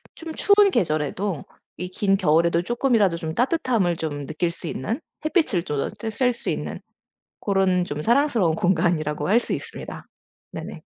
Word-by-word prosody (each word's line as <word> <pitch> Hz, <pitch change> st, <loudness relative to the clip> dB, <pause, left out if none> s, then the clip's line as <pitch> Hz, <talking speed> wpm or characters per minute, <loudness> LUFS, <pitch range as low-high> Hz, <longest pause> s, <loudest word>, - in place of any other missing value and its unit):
쫌 325 Hz, -1 st, -7 dB
추운 405 Hz, -1 st, +5 dB
계절에도 155 Hz, -, -1 dB, 0.3 s
이 180 Hz, +2 st, -4 dB
긴 195 Hz, +1 st, +1 dB
겨울에도 170 Hz, +1 st, +3 dB
쪼끔이라도 230 Hz, -6 st, +2 dB
좀 160 Hz, -1 st, -5 dB
따뜻함을 240 Hz, -, +1 dB
좀 145 Hz, -3 st, -4 dB
느낄 160 Hz, +4 st, -1 dB
수 170 Hz, -, -9 dB
있는 225 Hz, -, -3 dB, 0.2 s
햇빛을 310 Hz, -, +2 dB
쪼 150 Hz, -5 st, -3 dB
조 -, -, -1 dB
저 225 Hz, -, -5 dB
쐴 250 Hz, +3 st, +1 dB
수 -, -, -5 dB
있는 -, -, -3 dB, 0.6 s
고런 190 Hz, -3 st, +2 dB
좀 145 Hz, -3 st, -5 dB
사랑스러운 230 Hz, -, +3 dB
공간이라고 160 Hz, -4 st, +1 dB
할 230 Hz, +4 st, +5 dB
수 -, -, -4 dB
있습니다. -, -, -6 dB, 0.5 s
네네. -, -, -7 dB
185 Hz, 330 characters per minute, -24 LUFS, 160-240 Hz, 0.6 s, 추운